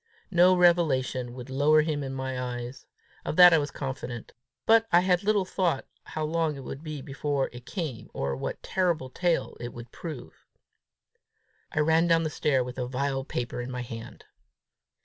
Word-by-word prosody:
No 180 +1 +6
revelation 135 -8 +2
would 125 0 -8
lower 150 +3 +4
him 150 -2 -1
in 135 - -4
my 130 -1 -3
eyes! 120 +2 -8 0.4
Of - - -3
that 180 0 +9
I 160 - +6
was 145 -1 -2
confident. 130 -4 -6 0.3
But 225 0 +5
I 175 +1 +5 0.2
little 205 -2 +2
thought 180 -6 0 0.2
how 155 - -4
long 160 -1 0
it 135 - -8
would 135 +4 -7
be 155 -4 -6
before 140 -1 -2
it 120 0 -11
came, 155 - -5
or 70 0 -2
what 65 - -3
a - - -42
terrible 170 -8 0
tale 175 +1 0
it 120 0 -6
would 120 0 -10
prove. 155 -8 -9 1.2
I 150 - +1
ran 160 +2 +3
down 165 -1 +4
the 155 - -2
stair 135 -4 +1
with 125 +1 -8
the 125 -1 -2
vile 135 +1 -1
paper 120 -3 -3
in 120 - -6
my 125 -1 -4
hand. 115 -2 -9
145 Hz, 180 wpm, -27 LUFS, 125-165 Hz, 1.2 s, that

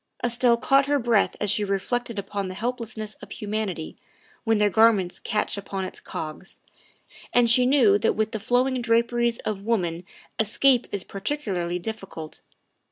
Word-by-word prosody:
Estelle 240 0 +3
caught 270 +3 +3
her 290 0 +2
breath 235 -5 +2
as 205 -2 +2
she 210 - +1
reflected 215 +4 -2
upon 200 0 -3
the 185 - -6
helplessness 225 -1 -4
of - - -11
humanity 205 -6 -4 0.5
when 225 -1 +3
their 210 0 +3
garments 215 -5 +3
catch 210 -1 -1
upon 195 -1 -4
its - - -8
cogs, 155 +4 -7 0.7
and 245 -1 +4
she 250 +1 +5
knew 240 -7 +5
that 225 - +1
with 220 0 0
the 220 - -3
flowing 250 +4 +1
draperies 235 0 +1
of 205 -2 -2
woman 180 -6 -1 0.4
escape 245 +4 +3
is 200 -2 -3
particu 215 +3 -3
larly 175 0 -2
difficult. 195 -6 -7
220 Hz, 160 wpm, -25 LUFS, 195-240 Hz, 0.7 s, she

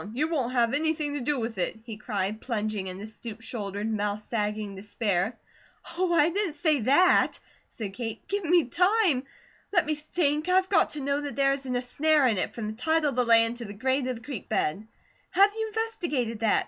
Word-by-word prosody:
You 300 +6 0
won't 260 -7 -1
have 235 -1 +2
anything 300 0 0
to 290 - -2
do 275 +2 0
with 225 -3 -4
it?" 180 - -1
he 225 -2 -7
cried, 210 -1 -3
plunging 215 -5 -2
into 185 +3 -6
stoop 220 0 -8
shouldered, 205 -3 -4
mouth 210 -1 -1
sagging 210 -2 -3
despair. 205 +1 -1 0.6
"Oh, 360 0 +1
I 325 -2 +4
didn't 385 -4 0
SAY 310 -2 +2
that!" 280 +11 +4 0.3
said 205 -4 -6
Kate. 225 0 -6
"Give 405 0 -1
me 345 0 +4
time! 360 - +2 0.5
Let 355 -4 +3
me 305 - 0
think! 305 +1 -1
I've 375 +1 +3
got 355 -5 +4
to 300 - -4
know 280 +1 0
that 290 -1 -5
there 275 0 +3
isn't 270 -2 -4
a 245 - -1
snare 300 +3 +2
in 220 -6 +2
it, - - -2
from 230 - -4
the 215 - -3
title 310 +6 +1
of - - -7
the 250 - +3
land 230 0 +5
to 240 - -7
the 205 - -7
grade 260 +4 0
of 255 - -2
the 230 - -12
creek 260 -5 -7
bed. 195 +8 -1 0.5
Have 400 +1 +5
you 445 0 -2
investigated 345 - -2
that? 220 -1 +3
255 Hz, 210 wpm, -27 LUFS, 215-310 Hz, 0.6 s, land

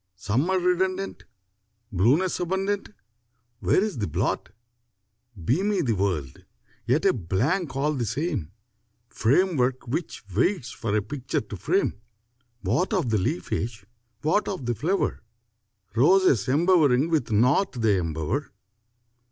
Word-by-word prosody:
Summer 130 - 0
redundant, 185 +2 0 0.7
Blueness 130 - +2
abundant, 190 +3 -1 0.7
Where 190 - +3
is 210 - -3
the 105 - -1
blot? 80 - -1 1.0
Beamy 190 - +1
the 120 -5 +1
world, 90 -10 -2 0.4
yet 145 +8 +2
a 195 - +5
blank 135 - -1
all 145 +3 +1
the 125 -5 -2
same, 130 - -2 0.6
Framework 130 -2 +1
which 155 +4 -4
waits 130 - +1
for 110 -2 -1
a 105 - 0
picture 130 +4 -3
to - - -8
frame: 105 - 0 0.6
What 185 +4 0
of 175 - +1
the 110 - +2
leafage, 95 +4 -2 0.4
what 160 +8 +2
of 185 -10 -4
the 120 - 0
flower? 165 - -1 0.7
Roses 145 - +4
embowering 155 -2 +3
with 155 -7 +1
naught 125 - +3
they 110 -5 +2
embower! 85 - -2
135 Hz, 120 wpm, -25 LUFS, 110-180 Hz, 1.0 s, a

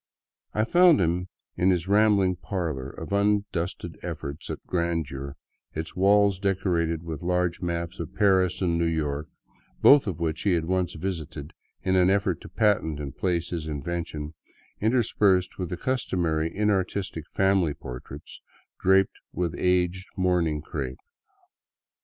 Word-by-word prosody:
I 110 - +3
found 175 +5 +5
him 90 +1 0 0.3
in 90 - +2
his 90 -1 +1
rambling 100 -2 +4
parlor, 80 -8 -3
of 100 - -7
undusted 100 -3 -1
efforts 70 +2 -6
at - - -6
grandeur, 80 -6 -2 0.4
its 80 +1 -5
walls 100 0 +4
decorated 85 -4 0
with 80 -3 -6
large 90 0 0
maps 85 -1 -3
of 85 - -6
Paris 95 -3 +3
and 85 -2 +1
New 85 - +2
York, 75 -2 -2 0.5
both 140 -5 +7
of 90 -4 -3
which 80 -2 -1
he 100 - +2
had 85 -2 0
once 90 -1 0
visited 80 -4 -5 0.3
in 95 - +1
an 90 0 +5
effort 95 -3 +1
to - - -10
patent 100 -9 +1
and 70 -3 -6
place 85 -2 -1
his 80 -3 -3
invention, 75 0 -4 0.5
interspersed 105 -5 +2
with 90 -3 -3
the 90 - -4
customary 85 -11 0
inartistic 95 -4 -1
family 95 -6 +2
portraits 60 -2 -9 0.4
draped 95 +1 +3
with 85 -2 -2
aged 90 +1 +1
mourning 85 -5 +1
crepe. 65 -6 -4
90 Hz, 140 wpm, -26 LUFS, 80-95 Hz, 0.5 s, both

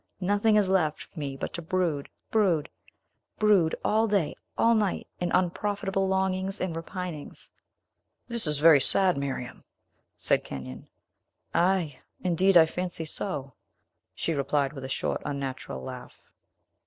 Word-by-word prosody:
Nothing 205 +3 +2
is 210 -2 +4
left 170 -5 +1
for 165 - -12
me 140 -2 -4
but - - -5
to 170 - -4
brood, 165 -4 -1 0.2
brood, 185 -9 +2 0.7
brood, 200 -7 +4
all 220 +1 +3
day, 200 -7 +1 0.2
all 230 - +5
night, 210 -4 0
in 175 -1 -1
unprofitable 195 +2 0
longings 190 +1 0
and 180 -3 -2
repinings." 170 -2 -7 0.8
"This 235 -7 -3
is 150 -1 0
very 150 -1 +7
sad, 185 +5 +4
Miriam," 135 -3 -4 0.5
said - - +1
Kenyon. 65 -1 -8 0.7
"Ay, 175 -6 +1 0.2
indeed; 185 +1 +4
I 165 - +8
fancy 175 0 -4
so," 145 -5 -4 0.6
she 165 - -1
replied, 140 -1 0
with 135 -2 -7
a - - -6
short, - - -1
unnatural 135 - -4
laugh. - - -9
175 Hz, 135 wpm, -27 LUFS, 145-195 Hz, 0.8 s, I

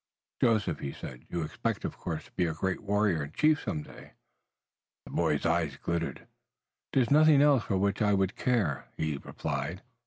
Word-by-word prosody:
"Joseph," 110 -4 +2
he 70 - -4
said, 65 0 -9
"you 85 -2 -2
expect, 75 - -3
of - - -4
course, - - -5
to - - -19
be 90 - 0
a 80 -1 -2
great 95 +3 -1
warrior 105 -5 +1
and 75 +2 -6
chief 155 -1 +3
some 75 - -3
day." - - -14 0.9
The - - -11
boy's 75 - +1
eyes 80 -4 +1
glittered. 85 +3 -3 0.7
"There 135 - +4
is 115 - -4
nothing 155 0 +7
else 140 -4 +4
for 95 - 0
which 100 +2 0
I 105 -1 +4
would 95 +1 0
care," 100 - 0
he 80 -2 -1
replied. - - -4
95 Hz, 185 wpm, -30 LUFS, 80-115 Hz, 0.9 s, nothing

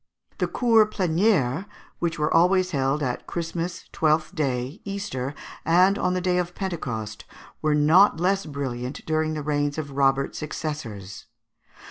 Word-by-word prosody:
The - - +1
Cours 225 -3 +4
Plénières, 185 - +1 0.3
which 170 -1 -1
were 150 +1 0
always 180 +2 +4
held 140 +1 0
at 125 -2 -3
Christmas, 170 +1 -4
Twelfth 155 +2 +1
day, 135 - -2
Easter, 195 -10 -4 0.3
and 185 +4 +4
on 180 0 +1
the 185 - 0
day 180 0 +1
of 175 0 -3
Pentecost, 120 - -4 0.4
were 155 -1 +2
not 160 +5 +5
less 190 +1 +1
brilliant 130 -3 -5
during 155 0 0
the 150 - -4
reigns 145 0 0
of 145 -2 -4
Robert's 135 0 +1
successors. 140 -11 -6
155 Hz, 140 wpm, -25 LUFS, 140-180 Hz, 0.4 s, not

